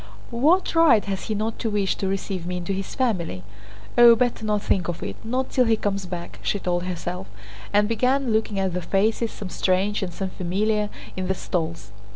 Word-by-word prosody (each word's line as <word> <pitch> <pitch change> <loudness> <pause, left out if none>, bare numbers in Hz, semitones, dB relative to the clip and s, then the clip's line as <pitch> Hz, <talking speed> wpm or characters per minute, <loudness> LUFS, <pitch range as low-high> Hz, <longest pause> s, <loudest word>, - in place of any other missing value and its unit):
"What 310 +11 +3
right 320 -10 +5
has 195 -1 -3
he 215 - -2
not 215 +2 -2
to 225 - -1
wish 205 -2 +1
to 195 - -2
receive 190 -2 -3
me 180 0 -2
into 180 +2 -3
his 195 0 -4
family? 180 - -1 0.6
Oh, 235 -1 +10
better 240 -1 0
not 210 -1 0
think 180 -3 +1
of 175 -1 -4
it—not 230 - -3
till 255 - +3
he 225 -1 +4
comes 200 -2 -2
back!" 175 -1 -6
she - - 0
told 175 -2 -1
herself, 180 +1 -4 0.4
and 205 0 +4
began 250 +2 +1
looking 220 -2 0
at 190 -2 0
the 180 - -2
faces, 215 +6 +1
some 195 - -7
strange 190 +4 +1
and 185 -2 -3
some 190 +2 -4
familiar, 210 +4 0 0.3
in 185 -1 -3
the 190 - 0
stalls. 165 - -3
200 Hz, 195 wpm, -24 LUFS, 180-225 Hz, 0.6 s, Oh